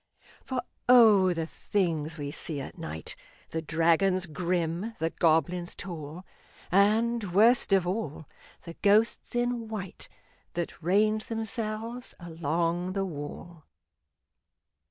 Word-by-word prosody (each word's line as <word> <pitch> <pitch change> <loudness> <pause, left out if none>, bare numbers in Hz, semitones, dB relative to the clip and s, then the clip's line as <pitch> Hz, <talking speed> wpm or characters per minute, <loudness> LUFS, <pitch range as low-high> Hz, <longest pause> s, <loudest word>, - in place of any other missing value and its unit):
For 255 -2 -3 0.3
O! 215 -7 +7
the 165 -2 -1
things 165 -4 -2
we 145 -1 -4
see 155 -1 -3
at 135 - -7
night 160 - -6 0.4
The 160 - -2
dragons 170 +4 +2
grim, 175 +4 -2
the 165 +1 -1
goblins 175 +2 +1
tall, 170 -1 -7 0.5
And, 210 +1 +2
worst 225 +4 +5
of 190 -2 +4
all, 175 -5 -3 0.4
the 170 - -8
ghosts 215 +4 +2
in 240 -1 0
white 205 -4 -6 0.5
That 175 0 -4
range 215 +5 +2
themselves 225 +1 -4
along 170 +2 -1
the 195 0 -1
wall! 160 0 -8
180 Hz, 115 wpm, -28 LUFS, 165-215 Hz, 0.5 s, O